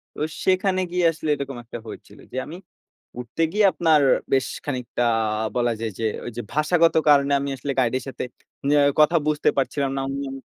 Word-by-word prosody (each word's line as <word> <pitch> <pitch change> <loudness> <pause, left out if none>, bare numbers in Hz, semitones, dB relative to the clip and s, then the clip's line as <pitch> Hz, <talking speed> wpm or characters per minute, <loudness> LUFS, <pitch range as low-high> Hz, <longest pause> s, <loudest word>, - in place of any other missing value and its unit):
তো - - -10 0.2
সেখানে 185 0 +2
গিয়ে 180 -1 +1
আসলে 155 -1 -5
এরকম 140 -2 -6
একটা 120 +1 -8
হয়েছিল - - -11
যে, - - -6
আমি 165 - -8 0.6
উঠতে 125 +7 -2
গিয়ে 210 +2 +3
আপনার 160 -3 +3 0.3
বেশ 135 -1 +2 0.2
খানিকটা 125 -3 -2 0.5
বলা 120 -1 +1
যায় 115 -1 -3
যে 115 - -1 0.2
ঐযে 120 0 -5
ভাষাগত 165 +2 +3
কারণে 140 -1 +5
আমি 140 0 -3
আসলে 140 +2 -3
গাইডের 130 +1 +1
সাথে 135 - -5 0.4
নে 145 - +3 0.3
কথা 155 +3 +5
বুঝতে 150 -1 +2
পারছিলাম 135 0 0
না। - - 0
উম 135 0 -4
140 Hz, 170 wpm, -23 LUFS, 130-160 Hz, 0.6 s, কারণে